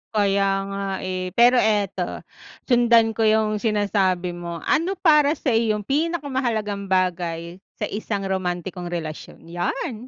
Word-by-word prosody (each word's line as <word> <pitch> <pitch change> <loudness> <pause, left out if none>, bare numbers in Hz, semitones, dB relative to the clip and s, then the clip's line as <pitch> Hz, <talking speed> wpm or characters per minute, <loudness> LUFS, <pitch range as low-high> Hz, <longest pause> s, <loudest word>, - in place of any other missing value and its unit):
Kaya 200 -1 +2 0.2
nga 200 0 -4 0.2
eh, 185 -1 -4
pero 245 +1 +6
eto, 200 -4 0 0.4
sundan 235 -2 +4
ko 225 0 +1
yung 215 -1 +2
sinasabi 195 -4 0
mo, 170 -1 -7
ano 365 +5 +1
para 300 -4 +4
sa 270 - -1
iyong 220 -2 +1
pinakamahalagang 260 - -1
bagay 175 -2 -1 0.2
sa - - -3
isang 205 -1 -3
romantikong 180 -1 -3
relasyon? 160 -3 -6
Yan. 215 +7 -3
205 Hz, 125 wpm, -23 LUFS, 185-235 Hz, 0.4 s, pero